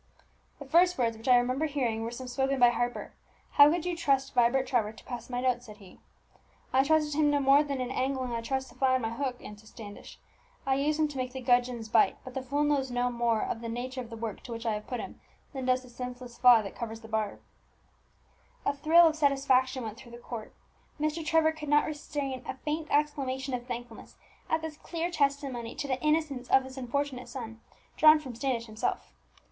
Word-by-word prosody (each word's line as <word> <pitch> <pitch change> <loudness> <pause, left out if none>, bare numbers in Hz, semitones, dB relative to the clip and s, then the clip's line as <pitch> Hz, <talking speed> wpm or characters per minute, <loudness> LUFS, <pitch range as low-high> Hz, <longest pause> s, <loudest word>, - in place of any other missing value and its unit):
"The 285 - -9
first 350 +5 +4
words 230 -2 +1
which 225 +3 -11
I 250 -1 +7
remember 255 +5 +1
hearing 250 -7 -1
were 225 - -3
some 250 +2 -7
spoken 265 +2 0
by 245 -1 +7
Harper 240 0 -3 0.4
'How 285 0 +8
could 345 +1 -1
you 355 -1 -1
trust 275 -4 +1
Vibert 250 +1 +3
Trevor 230 -6 0
to 225 - -15
pass 240 -1 -7
my 245 0 -2
notes?' 250 -1 0
said 210 -1 -11
he. 195 -4 -16 0.7
"'I 265 +1 +4
trusted 305 0 +2
him 300 0 +3
no 290 0 +2
more 275 +1 +5
than 280 -2 -3
in 255 0 -3
angling 260 -1 -1
I 230 -1 -2
trust 265 +2 -3
the - - -17
fly 260 -1 +3
on 255 - -1
my 225 - -1
hook,' 250 +1 -3
answered 210 +1 -11
Standish. 205 -3 -11 0.5
'I 270 - +2
use 290 +3 +1
him 310 -1 +2
to 290 -2 -8
make 255 -1 -3
the 260 - -5
gudgeons 245 -2 +1
bite; 215 -3 +3
but 260 - -9
the 265 - -3
fool 280 +3 -1
knows 285 -3 +1
no 245 0 0
more 235 -2 +1
of 225 - -3
the 230 - -5
nature 255 +3 -4
of 235 - -9
the 230 - -8
work 225 -2 -5
to 245 - -10
which 230 0 -6
I 225 - +1
have 210 0 -5
put 245 - -3
him - - -8 0.3
than 265 -2 -4
does 255 0 +2
the 250 - -14
senseless 250 0 -7
fly 245 -3 +6
that 195 - -8
covers 225 -1 -6
the 225 - -11
barb.'" 220 -2 -2 1.3
A - - +2
thrill 325 +4 +6
of 320 -1 +3
satisfaction 270 -3 +2
went 220 0 -6
through 235 -2 -13
the - - -8
court. 235 -2 -8 0.5
Mr. 310 +2 -1
Trevor 315 0 +3
could 310 -2 -8
not 295 0 +4
restrain 290 -3 -4
a - - -4
faint 300 +3 -3
exclamation 275 -3 0
of 245 0 -4
thankfulness 240 -2 -7 0.3
at 320 0 0
this 315 -2 -6
clear 335 +2 -4
testimony 275 -6 -1
to 285 - -4
the 260 -1 -2
innocence 300 -5 0
of 265 - +5
his 260 0 -10
unfortunate 260 -1 -3
son 230 -3 -7 0.4
drawn 310 0 +8
from 275 -5 -7
Standish 235 -1 -2
himself. 215 -1 -3
260 Hz, 220 wpm, -29 LUFS, 240-285 Hz, 1.3 s, How